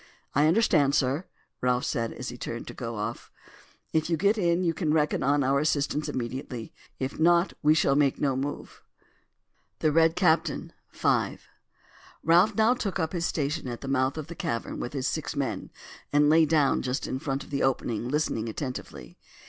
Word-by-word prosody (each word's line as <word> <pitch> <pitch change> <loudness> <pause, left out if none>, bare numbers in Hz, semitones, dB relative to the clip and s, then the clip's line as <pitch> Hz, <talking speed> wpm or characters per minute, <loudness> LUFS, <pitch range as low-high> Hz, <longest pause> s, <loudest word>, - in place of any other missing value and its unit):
"I 145 +2 +4
understand, 155 -7 +3
sir," 140 +6 +1 0.4
Ralph 125 0 +1
said 115 -4 -1
as 125 - -6
he 125 - -7
turned 115 0 -5
to - - -7
go 115 -2 -5
off. 105 +3 -5 0.6
"If 160 +1 +1
you 165 - +1
get 200 +6 +3
in 175 -3 +1
you 165 -2 +1
can 155 -1 -1
reckon 150 -1 +1
on 140 +2 +2
our 135 +2 +2
assistance 150 0 0
immediately; 125 -1 -5 0.2
if 130 +3 -4
not, 170 +2 +4
we 150 +1 +5
shall 160 -3 +3
make 140 -2 +2
no 135 -2 +1
move." 140 +2 -5 1.0
THE 155 - +1
RED 165 +1 +4
CAPTAIN.—V. 165 -4 0 0.9
Ralph 175 +6 +4
now 220 +3 +4
took 210 -7 -3
up 160 -2 -2
his 170 -1 0
station 150 -1 -2
at 120 -1 -5
the 135 - -6
mouth 135 +1 +1
of 155 - -4
the 170 - -8
cavern 150 -9 -3
with 120 - -5
his 135 -2 -1
six 155 -1 -3
men, 140 -4 -3 0.4
and 145 +1 +4
lay 160 0 +5
down 150 -3 +3
just 130 +1 -2
in 130 - -3
front 135 0 -3
of - - -16
the 140 - -1
opening 120 -3 0
listening 130 -6 -1
attentively. 125 - -7
145 Hz, 180 wpm, -27 LUFS, 130-160 Hz, 1.0 s, we